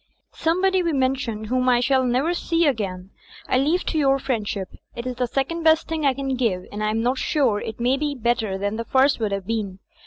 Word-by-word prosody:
"Somebody 370 +3 +1
we 340 -2 0
mentioned, 260 -5 -1
whom 255 +3 +1
I 245 -1 +4
shall 260 +1 +2
never 255 +7 +1
see 335 -1 +1
ag'ain, 195 -8 -2 0.4
I 255 - +2
leave 315 +7 +1
to 315 - -1
your 275 -2 +3
friendship. 215 -7 -3 0.3
It 235 - -6
is 250 -1 -4
the 250 -1 0
second 275 +7 -2
best 320 0 +4
thing 315 -3 0
I 265 - +2
can 270 0 -2
give, 225 -8 0
and 210 +1 -4
I 215 - +1
am 225 +1 0
not 255 +2 +1
sure 255 -9 +1
it 220 +1 -6
may 240 +2 +2
not - - -7
be 295 -1 -1
better 225 -5 0
thsui 205 +2 -2
the 230 - -4
first 270 +2 +3
would 215 -3 -1
have 195 -1 -3
been. 210 -3 -3
255 Hz, 230 wpm, -23 LUFS, 220-280 Hz, 0.4 s, I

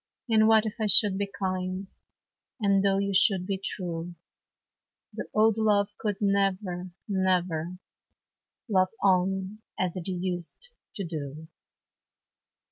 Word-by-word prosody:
And 220 -2 +3
what 220 0 +4
if 215 - -5
I 215 - +1
should 200 -1 +8
be 200 -1 -3
kind? 185 0 -3 0.7
And 200 -2 +2
though 195 -1 +2
you 200 0 -1
should 190 -1 +3
be 195 0 -3
true? 175 -2 -5 1.0
The - - -6
old 220 0 +2
love 205 -1 +1
could 205 -3 -2
never, 195 -3 -1 0.2
never 180 -3 -1 0.9
Love 185 -4 +2
on 190 +2 0 0.2
as 185 -1 -1
it 180 - -6
used 180 - -4 0.2
to 200 - -4
do. 155 -2 -7
190 Hz, 125 wpm, -26 LUFS, 180-205 Hz, 1.0 s, should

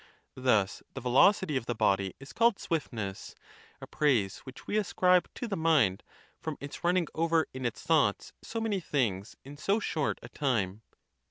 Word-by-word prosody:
Thus 110 -7 +1
the - - -3
velocity 140 - +4
of 115 - -5
the 120 - -1
body 95 -3 +1
is 135 - -11
called 230 -3 +3
swiftness: 115 - -4 0.4
a - - -8
praise 125 -11 +1
which 130 -1 -12
we - - -3
ascribe 180 -2 +3
to 245 - -4
the 205 - -2
mind, 155 - +3 0.4
from 155 -2 -5
its 140 0 -8
running 175 0 +2
over 165 -1 +2
in 130 -1 -2
its 115 - -6
thoughts 145 -11 +1
so 225 - -5
many 220 -3 -1
things 115 - -1
in 145 +1 -10
so 200 +8 +1
short 155 -8 -1
a 120 - -9
time. 110 -8 -1
140 Hz, 170 wpm, -30 LUFS, 115-175 Hz, 0.4 s, velocity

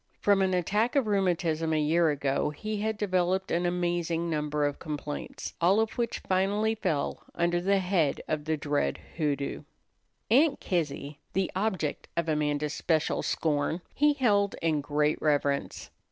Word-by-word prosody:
From 200 -1 +3
an 190 -1 +2
attack 210 - +1
of 275 -4 +3
rheumatism 175 -5 +1
a 155 - +2
year 160 +2 +3
ago 140 0 0
he 215 +8 -4
had 220 0 -1
developed 185 -1 0
an 175 +1 +1
amazing 175 -1 -1
number 150 -1 0
of 145 -1 -2
complaints, 150 -1 -5
all 185 +5 +4
of 225 0 +1
which 235 -1 -2
finally 200 +4 +2
fell 175 -10 -2
under 175 0 +1
the 200 +2 +3
head 180 -6 +1
of 150 -1 -2
the 155 0 0
dread 145 0 0 0.2
hoodoo. 145 -3 -1 0.7
Aunt 280 +4 +4
Kizzy, 145 -4 -2
the 190 -1 0
object 190 -7 -1
of 170 -1 0
Amanda's 150 -1 0
special 160 -1 0
scorn, 155 +2 0
he 295 +1 +4
held 205 -8 +2
in 155 -3 +1
great 150 +1 0
reverence. 145 -2 0
170 Hz, 155 wpm, -28 LUFS, 150-195 Hz, 0.7 s, all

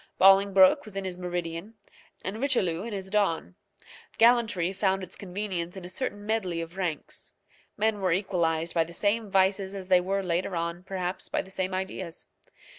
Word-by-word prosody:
Bolingbroke 195 0 +6
was 215 -2 -11
in 195 - -2
his 180 -1 -4
meridian, 175 +3 -4 0.5
and 210 +5 -4
Richelieu 190 -12 +1
in 235 - -5
his 190 -2 -5
dawn. 170 - +1 0.6
Gallantry 225 -7 +4
found 195 -1 +1
its 180 - -7
convenience 185 -2 -4
in 185 - -7
a - - -7
certain 205 0 -4
medley 200 -6 -1
of 165 +1 -6
ranks. 175 -6 -4 0.4
Men 215 0 +1
were 185 -2 +2
equalized 170 -3 0
by 165 - +3
the 170 +1 -11
same 210 +4 0
vices 195 0 +2
as 190 -1 -7
they 180 -1 +6
were 195 +2 -1
later 180 +1 -1
on, 170 +1 -2
perhaps, 185 -1 -3
by - - 0
the 190 - -14
same 185 -1 -2
ideas. 185 -2 -4
190 Hz, 175 wpm, -28 LUFS, 175-200 Hz, 0.6 s, Bolingbroke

